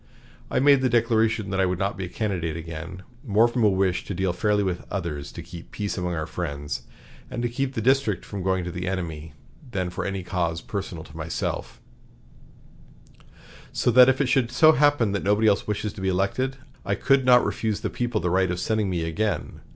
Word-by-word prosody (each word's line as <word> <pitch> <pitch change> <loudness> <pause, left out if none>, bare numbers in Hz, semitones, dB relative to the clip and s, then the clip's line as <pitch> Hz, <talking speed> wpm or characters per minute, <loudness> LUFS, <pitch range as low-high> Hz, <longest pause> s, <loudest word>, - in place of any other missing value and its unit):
I - - +1
made 140 0 +5
the 130 - +2
declaration 115 -3 +2
that 95 - -1
I 95 - +3
would 90 0 -1
not 100 +2 -1
be 95 +1 -4
a - - -8
candidate 90 -7 -2
again, 80 +3 -7 0.2
more 110 -2 +4
from 120 0 -1
a 105 - +6
wish 95 -2 +1
to 100 - -4
deal 95 0 0
fairly 105 +2 +1
with 90 -2 -2
others, 75 -7 -4
to - - -7
keep 85 -1 -11
peace 105 -1 -3
among 90 -1 -2
our 80 -1 -2
friends, 70 -2 -5 0.4
and 120 - -4
to - - +2
keep 135 +2 -2
the 110 - -2
district 130 -7 +2
from 100 -2 -6
going 95 0 0
to 90 - -4
the 90 +1 -4
enemy, 80 -4 -4 0.4
than 95 -5 -2
for - - -4
any 95 -1 -3
cause 85 -2 -1
personal 95 -5 -5
to - - -15
myself; - - -4 1.9
so 125 - +1
that, 125 +2 +8
if 130 - +2
it 140 - +3
should 125 -1 +2
so 155 +6 +7
happen 145 -7 +3
that 100 - -1
nobody 105 +2 +2
else 100 -2 +2
wishes 105 0 -2
to - - -9
be 95 - 0
elected, 100 +9 0 0.3
I 100 - 0
could 135 +5 +3
not 125 -1 +6
refuse 110 -2 -2
the - - -2
people 120 -3 -1
the 90 - -1
right 95 0 +2
of 90 0 -2
sending 110 0 0
me 85 -3 -1
again. 85 +2 -2
100 Hz, 215 wpm, -25 LUFS, 90-115 Hz, 1.9 s, that